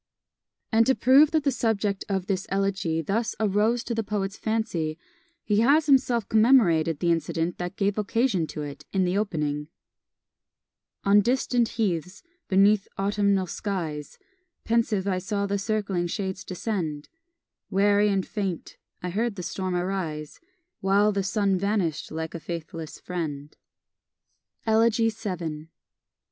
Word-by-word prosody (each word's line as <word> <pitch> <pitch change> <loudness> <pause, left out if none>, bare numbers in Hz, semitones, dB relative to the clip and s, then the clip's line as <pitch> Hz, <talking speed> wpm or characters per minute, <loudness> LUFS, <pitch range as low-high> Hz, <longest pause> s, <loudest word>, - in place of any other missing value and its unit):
And 225 0 +4
to 265 - +4
prove 275 +4 +6
that 315 -2 +1
the 280 - +2
subject 210 -5 0
of 190 -2 -1
this 190 -2 -2
elegy 195 -5 0
thus 220 +8 -1
arose 220 +3 +2
to 235 - -3
the 225 - 0
poet's 200 -1 -2
fancy, 220 -10 -2 0.5
he 210 -1 +1
has 285 +7 +4
himself 255 -6 +3
commemorated 205 - +4
the 170 +3 +1
incident 165 +1 -1
that 175 +2 -4
gave 200 +1 0
occasion 210 -5 +1
to 150 - -5
it, 145 -1 -8
in 190 -1 +1
the 180 +1 0
opening: 150 -8 -1 1.4
On 200 +1 +5
distant 245 0 +1
heaths, 180 -3 -1 0.2
beneath 200 +1 +4
autumnal 200 -1 +1
skies, 170 -7 -4 0.5
Pensive 225 -4 +1
I 185 -2 +1
saw 200 +2 -2
the 200 0 -1
circling 200 -4 -1
shades 190 +1 -3
descend; 175 -6 -3 0.6
Weary 205 +1 +3
and 195 -2 0
faint, 195 -5 -4 0.3
I 180 - -2
heard 220 +3 -1
the 180 - -6
storm 185 +1 -3
arise, 175 -5 -3 0.4
While 200 +2 +3
the 200 -1 0
sun 195 -1 +1
vanish'd 195 -6 -1
like 160 0 -5
a 170 - -5
faithless 165 -1 -6
friend. 150 -5 -5 1.1
Elegy 225 0 +3
vii. 170 -8 -5
195 Hz, 135 wpm, -26 LUFS, 175-220 Hz, 1.4 s, prove